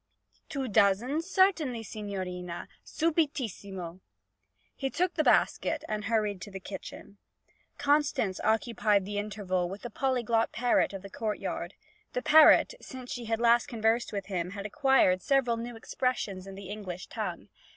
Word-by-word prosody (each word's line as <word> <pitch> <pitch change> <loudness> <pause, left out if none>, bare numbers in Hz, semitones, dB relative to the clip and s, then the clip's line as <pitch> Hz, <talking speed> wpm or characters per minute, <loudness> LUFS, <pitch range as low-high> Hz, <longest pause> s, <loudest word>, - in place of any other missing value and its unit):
'Two 275 -3 -3
dozen? 220 +7 +3
Certainly, 335 - +2
signorina. 185 -5 -5 0.2
Subitissimo!' 230 - -2 0.8
He 270 - -2
took 360 +5 0
the 310 - +1
basket - - +2
and 210 -1 -3
hurried 210 -4 0
to 205 - -7
the 195 -1 -7
kitchen. 200 +1 -9 0.6
Constance 285 -8 +1
occupied 220 -2 +2
the 205 +1 -3
interval 195 -4 -2
with 195 +2 -8
the 240 - -6
polyglot 235 -4 +1
parrot 245 +1 +2
of 195 -1 -7
the 195 - -8
courtyard. 215 0 -3 0.4
The 250 - -2
parrot, 310 +9 +7
since 255 -1 -9
she 245 -2 -5
had 225 0 -1
last 235 0 +4
conversed 225 +1 0
with 200 -2 -4
him, 180 -3 -2
had 200 - -5
acquired 215 -5 +3
several 255 0 +2
new 235 +1 -6
expressions 220 -5 -2
in 195 - -8
the 195 -1 -9
English 190 -4 -6
tongue. - - -5
220 Hz, 145 wpm, -29 LUFS, 195-260 Hz, 0.8 s, parrot